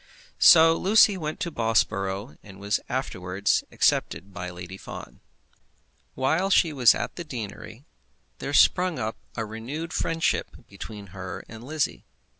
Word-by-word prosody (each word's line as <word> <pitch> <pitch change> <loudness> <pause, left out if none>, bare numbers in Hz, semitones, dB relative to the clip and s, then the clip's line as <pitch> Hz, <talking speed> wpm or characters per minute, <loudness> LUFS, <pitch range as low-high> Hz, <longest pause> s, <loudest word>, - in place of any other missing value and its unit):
So 165 -1 +8
Lucy 205 +3 +5
went 155 -1 -5
to 175 -4 -2
Bobsborough, 105 -3 0
and 95 -2 -14
was 100 +1 0
afterwards 100 -6 -1
accepted 95 +1 0
by 90 -1 -5
Lady 90 +1 -9
Fawn. - - -10 1.0
While 160 +9 +1
she 170 -4 +3
was 125 -4 +5
at - - -5
the 175 - -4
deanery 120 -2 -8 0.5
there - - -4
sprung 180 -2 +4
up 110 +1 -3 0.2
a 115 - -2
renewed 125 +10 -6
friendship 165 0 -1
between 100 0 -9
her 95 -1 -7
and 115 +1 -11
Lizzie. 150 +2 -2
115 Hz, 135 wpm, -25 LUFS, 100-160 Hz, 1.0 s, So